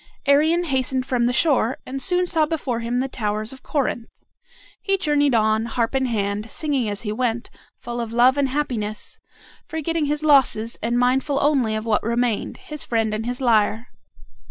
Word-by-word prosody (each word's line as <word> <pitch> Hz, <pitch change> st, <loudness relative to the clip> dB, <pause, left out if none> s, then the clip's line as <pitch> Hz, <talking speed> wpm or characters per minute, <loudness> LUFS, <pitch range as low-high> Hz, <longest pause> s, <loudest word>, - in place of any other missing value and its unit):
Arion 310 Hz, +5 st, +3 dB
hastened 260 Hz, -4 st, 0 dB
from 245 Hz, -2 st, +1 dB
the -, -, +1 dB
shore, 260 Hz, -3 st, +2 dB
and 270 Hz, +1 st, -5 dB
soon 360 Hz, +1 st, +1 dB
saw 320 Hz, -3 st, +1 dB
before 285 Hz, -7 st, -2 dB
him 235 Hz, +1 st, -2 dB
the 260 Hz, +2 st, 0 dB
towers 215 Hz, -2 st, -2 dB
of 265 Hz, -, -13 dB
Corinth. 255 Hz, -5 st, -2 dB, 0.7 s
He 390 Hz, -1 st, +1 dB
journeyed 290 Hz, -6 st, +2 dB
on, 220 Hz, 0 st, +2 dB
harp 230 Hz, 0 st, -1 dB
in 265 Hz, -1 st, +1 dB
hand, 210 Hz, -1 st, -2 dB
singing 275 Hz, -7 st, -1 dB
as 205 Hz, +1 st, -3 dB
he 210 Hz, -, -3 dB
went, 235 Hz, +1 st, -2 dB, 0.3 s
full 240 Hz, 0 st, -5 dB
of 230 Hz, -1 st, -5 dB
love 245 Hz, +3 st, +4 dB
and 280 Hz, -2 st, +1 dB
happiness, 235 Hz, -7 st, -3 dB, 0.5 s
forgetting 320 Hz, 0 st, -2 dB
his 295 Hz, +1 st, -2 dB
losses, 265 Hz, -6 st, +3 dB
and 235 Hz, +2 st, 0 dB
mindful 260 Hz, +3 st, +1 dB
only 270 Hz, -7 st, +2 dB
of 215 Hz, +1 st, -4 dB
what 220 Hz, -2 st, +1 dB
remained, 235 Hz, -1 st, -1 dB
his 300 Hz, -1 st, -6 dB
friend 225 Hz, -2 st, 0 dB
and 220 Hz, +2 st, -3 dB
his 245 Hz, +2 st, -3 dB
lyre. 225 Hz, -1 st, +2 dB
250 Hz, 180 wpm, -22 LUFS, 225-285 Hz, 0.7 s, love